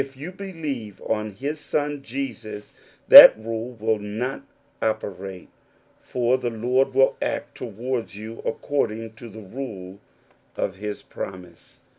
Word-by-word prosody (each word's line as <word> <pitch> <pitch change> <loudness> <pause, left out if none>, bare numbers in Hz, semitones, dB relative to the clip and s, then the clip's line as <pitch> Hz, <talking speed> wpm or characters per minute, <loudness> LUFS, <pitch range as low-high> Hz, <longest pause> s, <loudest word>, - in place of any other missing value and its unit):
you 150 +7 -7
believe 155 - -6
on 110 -1 -1
his 140 +9 -5
Son 145 -1 -2
Jesus, 115 -5 -6 0.3
that - - +12
rule 115 +2 -5
will 110 -1 -1
^^ 110 +6 -4 0.4
operate, 95 -4 -4 0.5
for 125 +1 0
the 120 - -2
Lord 125 +4 0
will 135 0 +4
act - - -3
towards 120 0 -4
you 110 +2 -8
accordi^^ 115 -4 -2
to 115 +1 -11
the 110 +1 -11
rule 100 -4 -8 0.6
of 95 - -2
his 105 +1 -6
promise. 90 -3 -9
115 Hz, 125 wpm, -24 LUFS, 105-130 Hz, 0.6 s, that